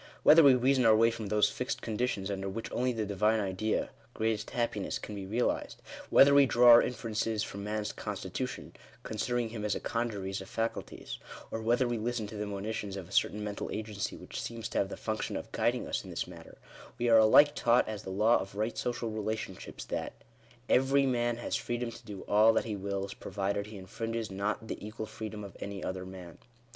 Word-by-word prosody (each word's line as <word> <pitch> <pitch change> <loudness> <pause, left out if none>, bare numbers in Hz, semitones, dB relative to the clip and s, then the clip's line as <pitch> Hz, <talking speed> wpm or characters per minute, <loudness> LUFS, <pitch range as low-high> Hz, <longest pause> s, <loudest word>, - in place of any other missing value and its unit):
Whether 160 +2 +9
we 140 -4 +7
reason 130 +1 +3
our 110 -2 +6
way 115 +1 +5
from 110 -2 -5
those 105 +1 +4
fixed 125 - -3
conditions 105 -3 -1
under 95 0 -3
which 110 +4 -5
only 125 +1 +1
the 110 -3 -2
Divine 105 +2 +2
Idea 100 +2 -1
— 115 +2 -30
greatest 110 -1 -1
happiness, 115 -5 -1
can 105 - -8
be 100 -2 -6
re 110 +4 -3
alized - - -1 0.2
— - - -13
whether 140 +1 +7
we 140 -1 +7
draw 120 0 +7
our 120 - +10
inferences 110 -3 -2
from 100 -2 -6
man's 105 0 -2
consti - - -5
tution, - - -4 0.3
considering 120 +1 -1
him 110 -2 -6
as 105 - 0
a - - -2
congeries 100 -5 -2
of 95 - -10
faculties 115 0 -4 0.2
— - - -15
or 110 - -3
whether 120 +3 +2
we 120 -1 -1
listen 115 0 -2
to 105 - -8
the 105 0 -3
monitions 100 0 -4
of 95 -3 -7
a - - -17
certain 105 +1 +1
mental 105 -1 -4
agency, 105 -2 -4
which - - -7
seems 115 -1 -5
to - - -1
have 95 - 0
the - - -6
function 110 -1 -3
of - - -8
guiding - - 0
us - - -2
in - - -10
this - - -3
matter, - - -12 0.4
we 120 - 0
are 115 -1 +7
alike 145 +7 +7
taught 120 +1 +3
as 110 -2 -4
the - - -8
law 105 +5 +4
of 95 +1 -7
right 110 +3 -2
social 120 -2 -2
relationships, 110 -3 -5
that - - -3 0.3
— 120 +2 -28
Every 135 +2 +4
man 120 -2 +1
has 120 - -3
freedom 120 -3 -2
to 120 - -12
do 105 -4 -8
all 110 +2 +6
that - - +1
he 110 -2 -3
wills, 100 0 -3
provided 100 +1 -3
he 110 - -11
J 95 -3 -8
infringes 115 +2 -4
not 105 +3 -2
the - - -6
equal 110 +1 -5
freedom 110 -1 -7
of 100 - -9
any 100 -2 -6
other 95 0 -4
man. 90 -3 -10
110 Hz, 220 wpm, -31 LUFS, 100-120 Hz, 0.4 s, our